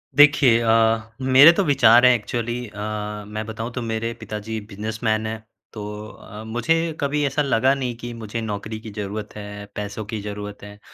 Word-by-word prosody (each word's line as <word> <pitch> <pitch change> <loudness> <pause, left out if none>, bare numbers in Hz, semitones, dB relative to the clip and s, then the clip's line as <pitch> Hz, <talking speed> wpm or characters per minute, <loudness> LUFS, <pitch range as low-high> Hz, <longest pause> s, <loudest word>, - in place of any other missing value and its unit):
देखिए 145 -5 +6
अ, 115 0 +2
मेरे 130 +5 +8
तो 195 - +1
विचार 125 -5 +6
हैं 125 - +7
एक्चुअली 120 +2 -3
अ, 105 0 -5
मैं 110 0 -5
बताऊँ 110 +2 -5
तो 125 - -3
मेरे 115 0 -2
पिताजी 110 +1 -5
बिजनेसमैन 110 +1 -2
हैं 110 0 -5 0.3
तो 105 - -7 0.3
अ, 110 -1 -11
मुझे 120 +8 0 0.2
कभी 145 +1 0
ऐसा 145 +2 0
लगा 135 -1 +3
नहीं 125 -3 -3
कि 120 0 -7
मुझे 115 0 -5
नौकरी 110 0 -5
की 110 -1 -9
ज़रूरत 105 +1 -6
है, 105 0 -8
पैसों 105 +1 -5
की 110 0 -5
ज़रूरत 105 0 -7
है। 105 0 -11
110 Hz, 175 wpm, -22 LUFS, 105-120 Hz, 0.3 s, मेरे